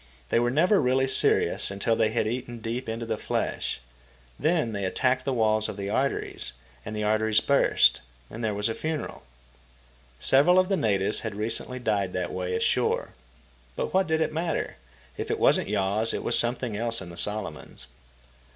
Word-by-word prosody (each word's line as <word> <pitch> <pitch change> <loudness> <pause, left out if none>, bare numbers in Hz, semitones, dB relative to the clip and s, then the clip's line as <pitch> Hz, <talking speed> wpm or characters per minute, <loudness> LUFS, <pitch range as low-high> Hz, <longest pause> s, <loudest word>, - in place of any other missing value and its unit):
They - - +3
were 120 0 +2
never 180 - +3
really 130 0 +2
serious 130 - +2
until 100 +3 0
they 110 -1 +2
had 110 0 0
eaten 120 +1 -4
deep 115 +2 -4
into 115 +1 -4
the 110 -1 -3
flesh. - - -2 0.6
Then 155 -6 +1
they 100 -2 -3
attacked 130 +7 0
the 135 - 0
walls 110 -3 +1
of - - -6
the 100 0 -4
arteries, 135 - -2 0.3
the 105 0 -4
arteries 110 0 +2
burst, 140 - +3 0.3
and 115 - -8
there 110 -2 0
was 105 +1 0
a 115 - -1
funeral. 155 +4 -4 1.0
Several 145 - +5
of 185 0 +4
the 195 - +2
natives 105 - 0
had 110 -3 -5
recently 115 +4 -3
died 105 -6 -1
that 90 -1 -3
way 90 0 -2
ashore. - - +1 0.7
But - - -3
what 190 0 +3
did 160 0 +1
it 160 - 0
matter? 165 +1 -2 0.4
If - - -4
it - - 0
wasn't - - +3
yaws, 105 +2 +1
it - - -4
was - - +1
something 120 -1 0
else 115 +2 0
in 90 -2 -9
the - - -10
Solomons. 100 -3 -5
115 Hz, 180 wpm, -26 LUFS, 105-130 Hz, 1.0 s, Several